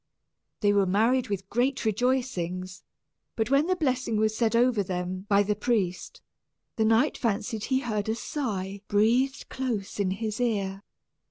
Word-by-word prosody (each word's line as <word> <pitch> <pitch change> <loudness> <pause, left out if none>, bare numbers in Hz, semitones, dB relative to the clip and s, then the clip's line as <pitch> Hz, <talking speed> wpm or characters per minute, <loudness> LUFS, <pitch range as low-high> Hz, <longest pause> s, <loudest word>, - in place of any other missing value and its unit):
They 205 -1 +4
were 200 -2 +3
married 230 +6 +2
with 195 -1 -3
great 245 +4 0
rejoicings; 200 -6 -1 0.5
but 225 +3 -1
when 280 +4 +4
the 370 - +2
blessing 255 -8 0
was 215 0 +1
said 230 0 +1
over 240 -2 +3
them 185 +1 -4
by 200 0 +5
the 210 +1 0
priest, 205 -5 -1 0.5
the 220 - +1
knight 225 +7 +3
fancied 225 -1 -1
he 260 0 +1
heard 215 -4 -2
a 220 - +1
sigh 200 -8 -4
breathed 240 +6 +2
close 230 -7 -3
in 195 -2 +1
his 215 +3 -3
ear. 200 -5 -1
220 Hz, 155 wpm, -27 LUFS, 200-250 Hz, 0.5 s, by